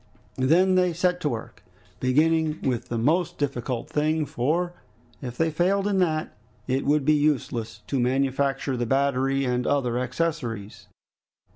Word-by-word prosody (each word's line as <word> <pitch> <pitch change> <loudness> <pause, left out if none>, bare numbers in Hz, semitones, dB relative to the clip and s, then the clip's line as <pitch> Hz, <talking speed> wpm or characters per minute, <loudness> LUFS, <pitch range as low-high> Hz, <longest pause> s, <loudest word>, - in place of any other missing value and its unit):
They 130 0 -1
then 180 +2 +4
set 180 +1 +1
to 150 - 0
work, 115 -4 -6 0.4
beginning 155 +4 +2
with 125 -1 -1
the 120 - -2
most 170 +8 +1
difficult 125 -4 -2
thing, 155 +1 0
for, 155 +6 -1 0.5
if 125 -3 -6
they 165 0 +1
failed 190 +5 +1
in 200 -2 +1
that, 155 -4 0 0.3
it 135 +1 -1
would 145 -1 +2
be 155 - +5
useless 120 -7 -1
to 135 - -1
manufacture 135 +2 0
the 120 -1 -2
battery 135 +1 +1
and 125 0 0
other 125 -4 +1
accessories. 125 -8 -3
140 Hz, 145 wpm, -25 LUFS, 125-160 Hz, 0.5 s, be